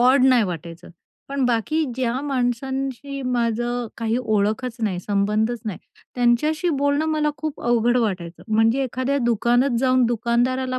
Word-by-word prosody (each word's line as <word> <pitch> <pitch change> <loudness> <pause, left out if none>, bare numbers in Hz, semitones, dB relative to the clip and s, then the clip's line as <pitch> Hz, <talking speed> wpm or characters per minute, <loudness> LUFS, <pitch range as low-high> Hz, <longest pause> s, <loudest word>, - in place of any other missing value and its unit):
Odd 255 +2 +5
नाही 255 -3 +5
वाटायचं. 170 -1 -7 0.4
पण 275 -1 -1
बाकी 250 +7 +1
ज्या 255 0 -1
माणसांशी 270 +1 -2
माझं 240 -1 -1
काही 230 0 -1
ओळखच 220 +2 -1
नाही, 190 -5 0
संबंधच 210 +4 0
नाही, 205 -6 -4 0.4
त्यांच्याशी 280 +8 +2
बोलणं 285 +2 +1
मला 305 -1 +1
खूप 310 -2 -5
अवघड 240 +1 +2
वाटायचं. 180 -7 -3
म्हणजे 225 +4 +3
एखाद्या 260 +3 -1
दुकानात 240 +3 +2
जाऊन 255 -1 +3
दुकानदाराला 250 +2 0
245 Hz, 135 wpm, -22 LUFS, 225-265 Hz, 0.4 s, Odd